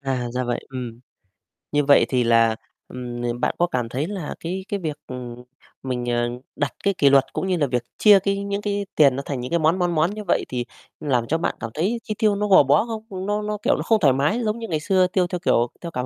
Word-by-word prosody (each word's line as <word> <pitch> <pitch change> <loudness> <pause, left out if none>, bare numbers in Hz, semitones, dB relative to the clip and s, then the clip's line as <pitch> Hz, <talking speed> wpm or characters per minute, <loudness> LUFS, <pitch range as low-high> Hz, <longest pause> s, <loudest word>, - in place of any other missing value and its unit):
À, 130 -3 -2
ra 125 0 -1
vậy, 120 0 -2
ừm. 125 -3 -7 0.7
Như 145 -1 +1
vậy 140 - +6
thì 125 -2 +2
là, 115 -1 +4 0.3
ừm, 120 -1 -6
n 120 - -8
bạn - - 0
có 175 - +3
cảm 125 -6 -2
thấy 140 +6 -2
là 190 -6 -5
cái 185 +3 -4
cái 200 - -2
việc, 155 -5 -4
ừm, 125 -1 -7 0.4
mình, 125 -2 -3
ờ, 120 0 0 0.3
đặt 145 -1 -2
cái 200 - +2
kỷ 140 - +5
luật, 135 -1 +3
cũng - - -2
như 185 -2 +1
là 145 -4 +1
việc 125 -1 -1
chia 205 -2 +7
cái 200 +1 -1
những 200 0 -3
cái 205 -1 -2
tiền 140 -4 +5
nó 140 - -4
thành 140 -3 -3
những 125 +1 -5
cái 170 - +2
món, 160 +4 +2
món, 175 -1 0
món 160 +4 +2
như 210 0 -6
vậy 185 - 0
thì 125 -1 -3 0.3
làm 125 -5 0
cho 160 - +1
bạn 165 - -2
cảm 115 - -5
thấy 205 +9 -1
chi 215 - -3
tiêu 215 -3 +2
nó 210 +1 -1
gò 190 -6 +7
bó 140 - +3
không? 215 -5 -6
Nó 205 +1 -1
nó, 210 0 -3
kiểu, - - +3
nó - - -3
không 225 -2 +3
thoải 140 -7 +4
mái 145 - +1
giống 215 +2 -1
như 225 - -5
ngày 155 -3 -1
xưa 185 +3 +2
tiêu 180 0 +1
theo, 180 0 -4
kiểu, 120 -9 +2
theo 170 - -6
cảm 125 -5 -3
155 Hz, 265 wpm, -23 LUFS, 125-200 Hz, 0.7 s, chia